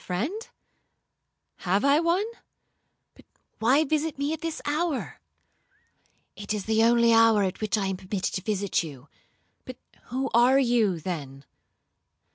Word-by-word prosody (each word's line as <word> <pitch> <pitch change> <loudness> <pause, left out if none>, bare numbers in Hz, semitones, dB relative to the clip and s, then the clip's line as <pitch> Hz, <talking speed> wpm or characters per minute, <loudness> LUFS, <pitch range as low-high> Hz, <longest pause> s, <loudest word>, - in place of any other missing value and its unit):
'—'My 180 - -4
friend? 370 - -3 1.1
Have 195 +6 0
I 280 +2 +4
one?—but 375 +8 -6 0.3
why 260 +7 +3
visit 310 0 -1
me 285 +2 -1
at 320 - -6
this 330 -1 -4
hour?'—'It 290 -8 -7
is 205 - -5
the 220 0 +2
only 235 0 +4
hour 225 -2 +5
at 190 +1 -3
which 215 0 0
I 200 - -1
am 190 -1 -2
permitted 190 +1 -4
to 185 - -3
visit 200 -1 -1
you.'—'But 155 - -13 0.3
who 265 +2 -3
are 245 +3 +5
you, 235 -9 +2
then?' 140 -6 -6
230 Hz, 130 wpm, -26 LUFS, 195-285 Hz, 1.1 s, hour